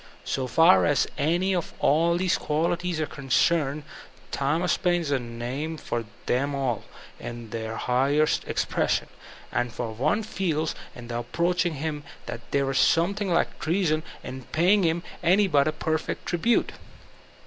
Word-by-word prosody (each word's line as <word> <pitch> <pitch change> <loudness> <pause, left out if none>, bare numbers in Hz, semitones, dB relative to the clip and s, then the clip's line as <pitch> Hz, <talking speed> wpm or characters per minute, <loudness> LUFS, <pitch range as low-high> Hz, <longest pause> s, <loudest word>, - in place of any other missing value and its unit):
So 130 -1 -1
far 165 +9 +6
as 145 - +3
any 175 +6 +1
or 175 - +2 0.2
all 165 +4 +3
of - - +1
these 185 0 +2
qualities 170 +2 -1
are 155 - +1
concerned 145 +1 +1 0.5
Thomas 155 +6 +1
Paine 175 -1 +1
is 150 -4 -3
a 140 - +2
name 125 +7 -4
for 120 -5 -3 0.2
them 140 +3 0
all, 130 -5 -1 0.3
in 120 -2 -7
their 110 -1 -4
highest 140 +5 +2
expression. - - 0 0.4
And 120 - 0
one 125 - 0
feeb 160 -7 -1 0.2
in 120 -1 -9
approaching 170 +8 0
him 150 0 -3 0.2
that 115 - -6
there 140 -1 +1
is 135 - +1
something 195 +4 +2
like 170 0 +1
treason 165 -2 +1 0.2
in 130 0 -7
paying 185 +6 +3
him 170 0 +1 0.2
any 185 +4 +4
but 145 -6 +3
a - - +2
perfect 160 0 -2
tribute. 205 +7 +1
155 Hz, 150 wpm, -26 LUFS, 135-175 Hz, 0.5 s, far